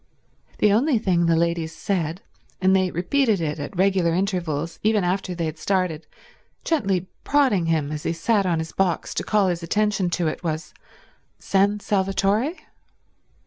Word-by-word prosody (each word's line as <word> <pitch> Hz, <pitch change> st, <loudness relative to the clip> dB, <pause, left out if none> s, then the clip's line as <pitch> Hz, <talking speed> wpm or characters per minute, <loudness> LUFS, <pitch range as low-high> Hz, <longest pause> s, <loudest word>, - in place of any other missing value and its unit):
The 210 Hz, -1 st, +4 dB
only 255 Hz, +4 st, +3 dB
thing 180 Hz, -5 st, +1 dB
the 165 Hz, -, +4 dB
ladies 165 Hz, -1 st, -1 dB
said, 175 Hz, -2 st, -2 dB, 0.4 s
and 190 Hz, +1 st, +3 dB
they 185 Hz, -1 st, +2 dB
repeated 215 Hz, -, +1 dB
it 155 Hz, -2 st, -2 dB
at 145 Hz, -, -6 dB
regular 185 Hz, -3 st, +2 dB
intervals, 170 Hz, -5 st, -2 dB
even 215 Hz, -2 st, +2 dB
after 185 Hz, 0 st, -1 dB
they 170 Hz, -1 st, -2 dB
had 155 Hz, 0 st, -5 dB
started, 180 Hz, -5 st, -1 dB, 0.6 s
gently 195 Hz, -, 0 dB, 0.2 s
prodding 260 Hz, -, +2 dB
him 155 Hz, -3 st, 0 dB
as 150 Hz, -1 st, -4 dB
he -, -, -1 dB
sat 195 Hz, +4 st, +1 dB
on 170 Hz, -2 st, +1 dB
his 160 Hz, 0 st, -4 dB
box 185 Hz, -4 st, -1 dB
to -, -, -2 dB
call 210 Hz, -3 st, +2 dB
his 175 Hz, -1 st, -2 dB
attention 205 Hz, +1 st, 0 dB
to 175 Hz, -2 st, 0 dB
it, 155 Hz, -, -4 dB
was, 160 Hz, -1 st, -3 dB, 0.6 s
"San 200 Hz, +1 st, +1 dB
Salvatore?" 200 Hz, -, +1 dB
185 Hz, 160 wpm, -23 LUFS, 165-200 Hz, 0.6 s, The